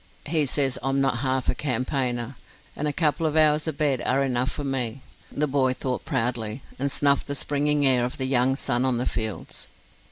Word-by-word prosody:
"He 155 -1 +1
says 135 -1 0
I'm 135 +2 0
not 135 -3 +1
half 130 0 0
a - - +2
campaigner, 125 -2 -2 0.4
and 150 - -1
a - - +1
couple 160 +1 +1
of 155 - -2
hours 155 0 +4
of 155 -3 -2
bed 140 -5 +1
are 135 +2 +2
enough 130 -1 0
for 145 - -5
me," 130 -2 -2 0.3
the 150 - 0
boy 135 -2 +2
thought 130 -1 -3
proudly, 115 0 -2 0.2
and 140 +1 0
snuffed 140 0 +2
the 140 - -2
springing 145 +1 +1
air 130 -2 +4
of 125 - -3
the 130 - -1
young 130 0 +2
sun 125 -3 0
on 130 -2 +1
the 120 - -1
fields. 110 -3 -4
135 Hz, 200 wpm, -25 LUFS, 125-145 Hz, 0.4 s, hours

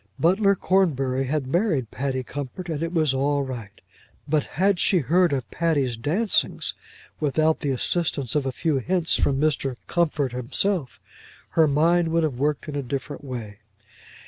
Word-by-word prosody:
Butler 195 +4 +3
Cornbury 135 -10 +1
had 140 +1 -1
married 150 - 0
Patty 130 -1 -2
Comfort 145 +7 -6
and 155 -2 -3
it 165 0 -2
was 155 -5 +2
all 140 +1 +1
right. 115 -6 -7 0.5
But 150 -1 +1
had 190 +1 +3
she 190 - +3
heard 175 +4 +3
of 130 -5 -2
Patty's 145 -8 0
dancings 170 - +1 0.5
without 155 +2 +2
the 145 - -2
assistance 140 -1 -1
of 145 -3 0
a - - 0
few 150 +1 0
hints 170 +5 +1
from 135 -1 +1
Mr. 145 -3 0
Comfort 150 -6 0
himself, 130 +6 -1 0.5
her 160 -1 +4
mind 165 +4 +3
would 165 0 +1
have 140 -6 -2
worked 150 +2 0
in 150 - -5
a 145 - -1
different 140 +3 -5
way. 115 -6 -7
145 Hz, 160 wpm, -24 LUFS, 130-170 Hz, 0.5 s, her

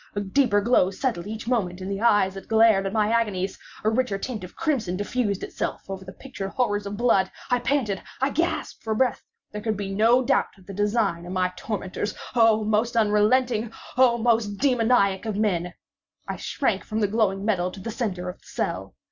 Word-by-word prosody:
A - - 0
deeper 205 +1 +2
glow 200 -4 +3
settled 195 -3 -2
each 220 +1 -6
moment 195 -8 0
in 185 - -6
the 195 +1 -3
eyes 205 -5 +4
that 195 -1 -9
glared 220 -3 +4
at - - -3
my 210 0 +1
agonies! 205 -5 0 0.2
A 215 - +3
richer 245 -3 0
tint 220 0 -5
of 180 - -10
crimson 260 - -1
diffused 205 -1 -1
itself - - -4
over 190 -1 -6
the 190 - -9
pictured 195 -3 -7
horrors 205 -3 -1
of 200 0 -5
blood. 200 -6 +3 0.2
I 245 - +3
panted! 240 -6 0 0.2
I 270 +2 +1
gasped 330 +5 -2
for 220 -1 -2
breath! 250 +1 +1 0.3
There 210 - -5
could 215 -1 -1
be 195 -1 -4
no 230 +5 +4
doubt - - +1
of 190 - -19
the 195 - -8
design 205 -4 0
of 180 - -5
my 185 -1 0
tormentors—oh! 215 +2 0
most 220 +3 +1
unrelenting! 220 +2 +2 0.2
oh! 250 -2 +5
most 225 -3 +1
demoniac 230 -6 +2
of 215 - -2
men! 180 -5 0 0.6
I - - -4
shrank - - -1
from 215 0 -3
the 205 - +3
glowing 200 -2 0
metal 185 -5 +1
to 190 - -10
the 225 +4 -5
centre 195 -6 -3
of 180 - -7
the - - -22
cell. - - -3
210 Hz, 200 wpm, -25 LUFS, 195-235 Hz, 0.6 s, oh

